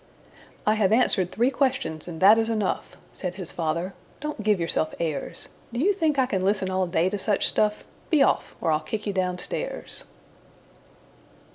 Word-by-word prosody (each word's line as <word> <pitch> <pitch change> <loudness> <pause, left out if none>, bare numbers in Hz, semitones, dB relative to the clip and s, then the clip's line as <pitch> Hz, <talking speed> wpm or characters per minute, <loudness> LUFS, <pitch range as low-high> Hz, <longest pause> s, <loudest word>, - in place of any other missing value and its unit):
"I 215 - +4
have 215 -3 +2
answered 215 -6 +3
three 240 +5 +2
questions, 250 - -1
and 165 -2 -6
that 210 +4 +8
is 225 0 0
enough," 215 -4 -2 0.2
Said 180 -2 -4
his 185 -4 -6
father. 170 +3 -2 0.3
"Don't 300 -5 -4
give 210 -2 +2
yourself 165 -2 0
airs! 155 -5 -3 0.2
Do 240 - -3
you 390 +9 +4
think 320 -6 +1
I 260 - +4
can 195 -7 -1
listen 190 -1 +1
all 185 0 +1
day 170 0 +2
to 205 - -2
such 205 0 +1
stuff? 210 0 +1 0.3
Be 310 -4 +5
off, - - +1
or 165 - +1
I'll 155 - +3
kick 210 +7 -5
you 205 - -1
down 180 -1 0
stairs. 180 - -4
200 Hz, 180 wpm, -25 LUFS, 180-225 Hz, 0.3 s, that